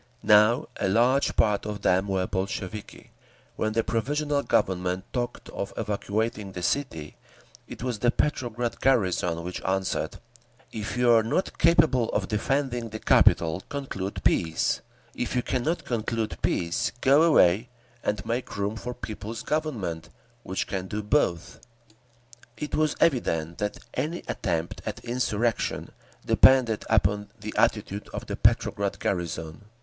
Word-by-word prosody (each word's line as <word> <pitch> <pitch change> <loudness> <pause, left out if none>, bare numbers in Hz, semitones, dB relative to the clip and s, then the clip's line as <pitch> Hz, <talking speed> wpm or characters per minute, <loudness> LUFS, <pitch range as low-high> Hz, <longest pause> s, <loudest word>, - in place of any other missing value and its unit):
Now 105 +3 +5
a - - 0
large 125 +7 +3
part 105 -1 +2
of 105 -1 -5
them 95 +2 +3
were 95 -2 0
Bolsheviki. 95 +2 -5 0.4
When 110 0 -1
the 115 - +1
Provisional 145 +6 0
Government 90 -5 0
talked 120 -1 -3
of 100 - -5
evacuating 105 -1 -2
the 90 - -6
city, 80 - -2 0.5
it - - -8
was 125 -4 -2
the 120 - +3
Petrograd 120 -4 -1
garrison 90 -9 +2
which 90 +1 -5
answered, 95 0 -1 0.5
"If 110 +2 -4
you 125 -1 +4
are 115 -1 +6
not 115 - -1
capable 155 -8 +4
of - - 0
defending 120 +1 -1
the 110 - -5
capital, 85 -4 +4
conclude 115 -9 -4
peace; 80 -1 +1 0.3
if 125 - -3
you 125 - +1
cannot 140 +7 -1
conclude 115 -1 -2
peace, 85 0 0
go 140 +3 +5
away 120 - +4 0.3
and 105 -1 -1
make 120 0 -3
room 100 +2 -1
for 125 +2 -5
a - - -7
People's 110 +1 -6
Government 115 - -2 0.3
which 95 -4 -3
can 95 -1 -4
do 105 +2 -4
both…." 100 - 0 1.0
It 150 - -5
was 155 -1 +2
evident 85 - +1
that 105 0 -2 0.2
any 165 +4 -2
attempt 85 0 -2
at - - -6
insurrection 120 -2 -1 0.3
depended 125 -5 +5
upon 105 -1 +2
the 105 +1 -6
attitude 105 -1 0
of - - -5
the - - -4
Petrograd 100 -1 +1
garrison. 85 -1 -3
110 Hz, 140 wpm, -26 LUFS, 95-125 Hz, 1.0 s, are